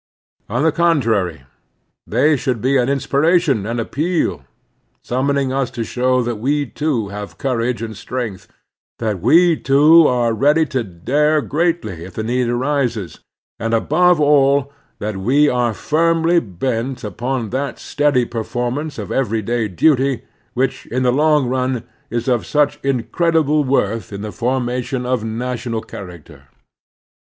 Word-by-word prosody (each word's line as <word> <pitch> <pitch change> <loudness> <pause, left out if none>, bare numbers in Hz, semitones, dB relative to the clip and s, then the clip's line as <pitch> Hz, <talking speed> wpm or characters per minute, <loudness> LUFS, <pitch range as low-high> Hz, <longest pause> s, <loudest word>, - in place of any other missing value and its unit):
On 120 +7 0
the 160 - +4
contrary, 115 - +1 0.6
they 140 +7 +3
should 130 -3 -2
be 130 +5 +1
an 125 -1 +2
inspiration 140 - +1
and 115 +1 -2
appeal, 160 +9 -1 0.6
summoning 135 +1 0
us 135 -2 0
to 115 - -4
show 125 +2 +1
that 120 -1 -3
we 145 +6 0
too 130 -6 -2
have 105 0 -7
courage 125 -3 -1
and 110 -1 -6
strength; 115 -4 -5 0.5
that 105 -6 -2
we 170 - +5
too 150 +4 +5
are 120 -2 +1
ready 150 +8 +3
to 130 -5 -2
dare 145 - +1
greatly 150 - -1
if 90 0 -11
the 110 - -3
need 120 +1 0
arises; 120 - -1 0.4
and, 115 0 0
above 175 +8 +3
all, 140 -1 +3 0.2
that 105 -1 -4
we 135 +10 +3
are 125 -3 +1
firmly 165 +7 +2
bent 120 - -3
upon 120 +3 -3
that 135 +2 -3
steady 145 -4 +1
performance 125 +6 -3
of - - -6
everyday 115 -2 0
duty 135 - +2 0.3
which, 130 +1 -1
in 130 +2 -1
the 125 -1 +3
long 150 -1 +3
run, 130 -1 -1 0.3
is 120 +2 -3
of 120 -3 0
such 150 -1 +1
incredible 150 +4 +1
worth 115 -6 0
in 100 0 -6
the 105 - -5
formation 125 +1 -2
of 125 -3 -1
national 115 0 -3
character. 90 -8 -11
125 Hz, 140 wpm, -18 LUFS, 115-145 Hz, 0.6 s, we